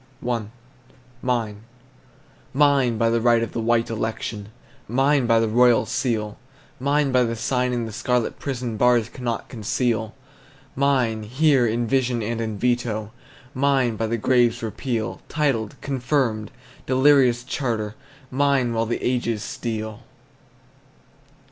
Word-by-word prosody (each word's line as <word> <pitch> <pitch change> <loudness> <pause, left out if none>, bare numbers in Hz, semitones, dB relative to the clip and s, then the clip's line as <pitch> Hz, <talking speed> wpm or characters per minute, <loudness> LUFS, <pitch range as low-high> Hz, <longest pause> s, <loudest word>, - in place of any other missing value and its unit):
I. 120 -3 -1 0.8
MINE. 115 -5 -1 0.9
Mine 140 -5 +3
by 115 +1 +2
the 115 0 +1
right 120 -1 +4
of 115 - -4
the 115 - -3
white 115 0 +1
election! 110 -2 -4 0.4
Mine 135 +2 +2
by 115 -1 +4
the 115 - +1
royal 120 +2 +4
seal! 115 -4 -2 0.4
Mine 140 +1 +1
by 130 0 +4
the 115 -1 0
sign 125 +2 0
in 120 -2 -1
the 110 - -6
scarlet 120 +2 -1
prison 125 -5 -4
Bars 120 -1 +3
cannot 120 -3 -4
conceal! 110 -1 -1 0.6
Mine, 130 -5 +1
here 130 +3 +2
in 120 +2 0
vision 125 -2 0
and 115 +1 -2
in 110 -2 -3
veto! 115 -2 -1 0.4
Mine, 130 -3 +2
by 115 +1 -2
the 115 +1 -1
grave's 120 +1 +2
repeal 115 0 -3
Titled, 135 -8 0
confirmed, 130 -5 -1 0.4
delirious 130 -2 +4
charter! 115 -5 -2 0.4
Mine, 135 -3 +2
while 115 0 0
the 120 - -3
ages 120 -4 0
steal! 110 -2 -5
120 Hz, 130 wpm, -23 LUFS, 115-130 Hz, 0.9 s, right